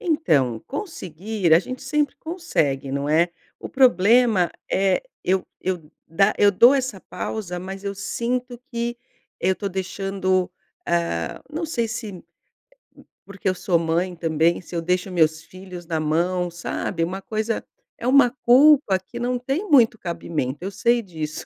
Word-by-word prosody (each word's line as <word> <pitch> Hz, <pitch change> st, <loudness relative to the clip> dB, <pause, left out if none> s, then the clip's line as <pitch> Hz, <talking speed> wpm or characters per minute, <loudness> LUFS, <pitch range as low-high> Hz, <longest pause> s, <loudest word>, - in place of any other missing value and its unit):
Então 155 Hz, -, +1 dB
conseguir, 200 Hz, -, -3 dB
a -, -, +7 dB
gente 255 Hz, +8 st, -6 dB
sempre 295 Hz, -3 st, 0 dB
consegue, 155 Hz, -, -2 dB
não 140 Hz, +1 st, -2 dB
é. 165 Hz, +3 st, +3 dB, 0.3 s
O -, -, -7 dB
problema 230 Hz, -5 st, +4 dB, 0.2 s
é 195 Hz, -, +2 dB, 0.2 s
eu 185 Hz, 0 st, +1 dB, 0.2 s
eu 175 Hz, -5 st, -3 dB, 0.2 s
dá 195 Hz, +6 st, +3 dB
eu 205 Hz, -, +6 dB
dou 235 Hz, +7 st, +6 dB
essa 255 Hz, -8 st, -2 dB
pausa, 180 Hz, -3 st, -5 dB
mas 190 Hz, +2 st, -7 dB
eu 200 Hz, -, -3 dB
sinto 245 Hz, +4 st, -3 dB
que 235 Hz, 0 st, -3 dB, 0.4 s
eu 185 Hz, -, +2 dB
estou 200 Hz, +2 st, -3 dB
deixando, 190 Hz, -1 st, -1 dB, 0.4 s
ah, 85 Hz, -1 st, -1 dB
não 325 Hz, +3 st, -2 dB
sei 235 Hz, -7 st, -1 dB
se 215 Hz, -5 st, -6 dB, 1.0 s
porque 200 Hz, -1 st, -3 dB
eu 185 Hz, -, 0 dB
sou 175 Hz, -1 st, +1 dB
mãe 170 Hz, +2 st, -1 dB
também 165 Hz, +1 st, +1 dB
se 180 Hz, -, -10 dB
eu 170 Hz, -, 0 dB
deixo 180 Hz, +2 st, -1 dB
meus 160 Hz, -3 st, +2 dB
filhos 185 Hz, -2 st, -10 dB
na 165 Hz, -2 st, -1 dB
mão, 175 Hz, +4 st, 0 dB
sabe, 170 Hz, 0 st, -3 dB
uma 185 Hz, +3 st, -3 dB
coisa 220 Hz, 0 st, -2 dB, 0.3 s
É 235 Hz, -, -4 dB
uma 260 Hz, -1 st, +6 dB, 0.2 s
culpa 260 Hz, -5 st, +6 dB
que 235 Hz, +6 st, -10 dB
não 245 Hz, +1 st, -1 dB
tem 275 Hz, +11 st, -3 dB
muito 245 Hz, -6 st, +5 dB
cabimento. 160 Hz, -7 st, -3 dB
Eu 195 Hz, -, -3 dB
sei 235 Hz, +4 st, +2 dB
disso, 160 Hz, -6 st, -6 dB
190 Hz, 155 wpm, -23 LUFS, 170-240 Hz, 1.0 s, a